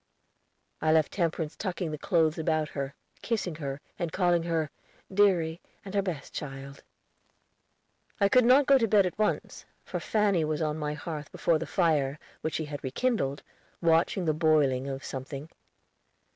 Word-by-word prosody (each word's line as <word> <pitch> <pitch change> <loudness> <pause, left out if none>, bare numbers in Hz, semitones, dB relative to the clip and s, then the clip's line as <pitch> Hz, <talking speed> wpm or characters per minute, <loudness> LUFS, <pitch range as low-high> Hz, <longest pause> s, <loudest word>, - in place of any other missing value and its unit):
I 155 - +3
left 155 -2 +3
Temperance 165 -3 -1
tucking 180 -4 -3
the 150 - -4
clothes 160 -3 +2
about 155 -1 0
her, 140 -1 -4 0.3
kissing 215 -7 -1
her, 140 -3 -4 0.2
and 170 -2 -2
calling 175 -2 +2
her 165 -3 -1 0.4
"deary 180 -5 +3 0.2
and 195 - -7
her 200 - +3
best 175 -8 -5
child." 140 -1 -7 1.4
I 200 - +5
could 250 +5 +5
not 260 +4 +6
go 275 0 +6
to 230 - +2
bed 205 -2 +5
at 180 - -4
once, 215 - -1 0.2
for - - -4
Fanny 205 -6 +2
was 155 0 -1
on 155 -1 -1
my 150 0 -2
hearth 150 -1 -6
before 165 -2 +1
the - - -4
fire, 150 -6 +1 0.2
which 160 - -2
she 160 - -1
had 145 -1 -7
rekindled, 140 - -1 0.4
watching 170 +2 +2
the 155 - +2
boiling 150 -5 +2
of 135 0 -5
something. 140 +3 -6
160 Hz, 160 wpm, -28 LUFS, 150-185 Hz, 1.4 s, not